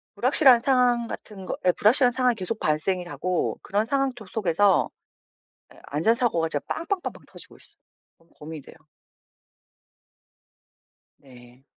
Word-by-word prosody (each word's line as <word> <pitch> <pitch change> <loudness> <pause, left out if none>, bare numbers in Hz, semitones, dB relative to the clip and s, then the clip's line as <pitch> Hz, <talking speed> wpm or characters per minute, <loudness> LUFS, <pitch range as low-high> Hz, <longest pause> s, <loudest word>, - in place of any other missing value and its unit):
불확실한 255 +2 +5
상황 245 -2 +2
같은 195 -4 -9
거 - - -3
예. 180 - +6
불확실한 245 +7 +4
상황이 250 -1 +1
계속 215 +2 -4
발생이 175 +4 0
하고 180 0 -2
그런 205 +2 0
상황 275 +1 0
토 230 -4 -12
속에서 195 -1 +2 0.8
예. - - -18
안전 160 +10 +2
사고가 215 -10 0
진짜 145 -3 -2
빵빵빵빵 355 +3 -4
터지고 - - -8
있어. - - -23 0.4
너무 165 0 -30
고민이 155 0 -9
돼요. - - -15 2.4
네. 125 -1 -18
205 Hz, 290 characters per minute, -25 LUFS, 165-245 Hz, 2.4 s, 예